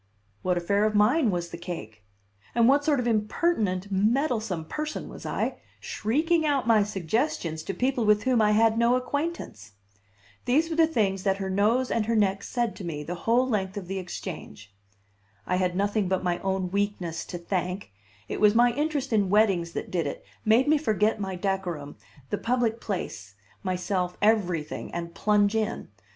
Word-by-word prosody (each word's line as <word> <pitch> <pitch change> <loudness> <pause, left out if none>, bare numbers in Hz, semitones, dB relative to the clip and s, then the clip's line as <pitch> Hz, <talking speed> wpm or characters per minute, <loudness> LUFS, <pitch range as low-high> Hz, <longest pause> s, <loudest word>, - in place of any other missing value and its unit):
What 180 -1 +1
affair 200 +4 +1
of 215 0 0
mine 235 +6 +4
was 175 -2 -2
the 170 - -7
cake? 110 - -7 0.5
And 235 -1 +5
what 280 +2 +4
sort 290 -2 +2
of 250 - -1
impertinent, 210 - 0
meddlesome 215 - +1
person 305 - -4
was - - -8
I, - - -2 0.2
shrieking 315 +9 0
out 285 -4 +1
my 225 -2 +5
suggestions 190 - -1
to 195 +4 -5
people 255 +2 0
with 210 0 +3
whom 255 -3 +3
I 210 0 +4
had 225 +1 +4
no 235 +1 +4
acquaintance? 255 - -4 0.7
These 310 +7 +2
were - - -1
the 325 0 +5
things 200 -11 0
that 195 0 +1
her 190 -1 -3
nose 225 +7 +2
and 220 -2 0
her 230 - +1
neck 195 -2 +2
said 240 -3 -2
to - - -8
me 155 -4 -4
the 170 - -4 0.2
whole 250 +3 +4
length 205 -4 -1
of 190 -3 -6
the 195 +1 -3
Exchange. 105 - -8 0.7
I 180 - 0
had 180 -1 0
nothing 205 +1 +1
but 190 0 0
my 175 -1 0
own 190 -1 -2
weakness 195 -4 -2
to 175 - -6
thank; 180 - -3 0.4
it - - -4
was 210 0 +5
my 240 +1 +5
interest 290 -2 -1
in 205 -3 +2
weddings 190 -5 +3
that - - -5
did 170 -5 0
it, - - -6 0.2
made 230 +5 +4
me 305 0 +4
forget 215 -6 +1
my 190 -1 -3
decorum, 180 -6 -3 0.4
the 205 - -1
public 235 -1 0
place, 105 - -5 0.3
myself, 180 -1 -2
everything, 180 -8 0
and 170 0 -4
plunge 210 -1 +2
in. 220 0 -2
205 Hz, 180 wpm, -27 LUFS, 180-235 Hz, 0.7 s, And